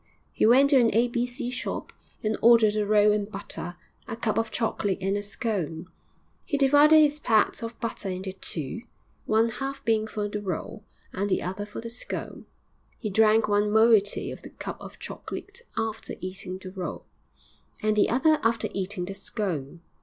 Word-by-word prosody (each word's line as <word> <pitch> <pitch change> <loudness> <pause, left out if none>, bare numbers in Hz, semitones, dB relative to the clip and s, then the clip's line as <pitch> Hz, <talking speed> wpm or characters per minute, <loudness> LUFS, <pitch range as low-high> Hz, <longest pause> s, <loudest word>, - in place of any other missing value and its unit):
He - - +3
went 270 +5 +6
to 275 - +7
an 235 -2 +4
A. 235 +2 +4
B. 240 +1 0
C. 245 0 -4
shop 250 - -4 0.3
and 215 0 +1
ordered 225 -2 +6
a 210 -1 0
roll 210 0 +5
and 210 0 -1
butter, 195 -3 -6 0.3
a - - -4
cup 225 -1 0
of 225 0 -1
chocolate 215 -4 -1
and 195 +1 0
a 205 - -1
scone. 190 -6 -4 0.5
He 285 - -1
divided 290 +3 +6
his 300 -1 +4
pat 220 -6 +2
of 230 0 -6
butter 225 -4 -4
into 185 +1 -4
two, 165 - -5 0.5
one 225 +2 +3
half 270 +3 -5
being 220 -1 +2
for 210 -1 -3
the 210 0 -4
roll 195 +2 -5 0.3
and 200 +2 -1
the - - +1
other 190 +3 -4
for 210 - -7
the 230 0 -6
scone; 240 - -6 0.5
he 215 - -4
drank 220 +2 +4
one 205 0 +2
moiety 220 -1 +4
of - - -9
the - - -10
cup - - -7
of - - -10
chocolate - - -8 0.2
after 225 -1 -3
eating 185 0 -6
the 185 0 -9
roll, 185 -2 -6 0.8
and 215 0 +2
the 210 - +3
other 310 +5 +3
after 230 0 +1
eating 190 -1 -2
the 195 - -5
scone. 175 - -4
215 Hz, 185 wpm, -26 LUFS, 195-230 Hz, 0.8 s, to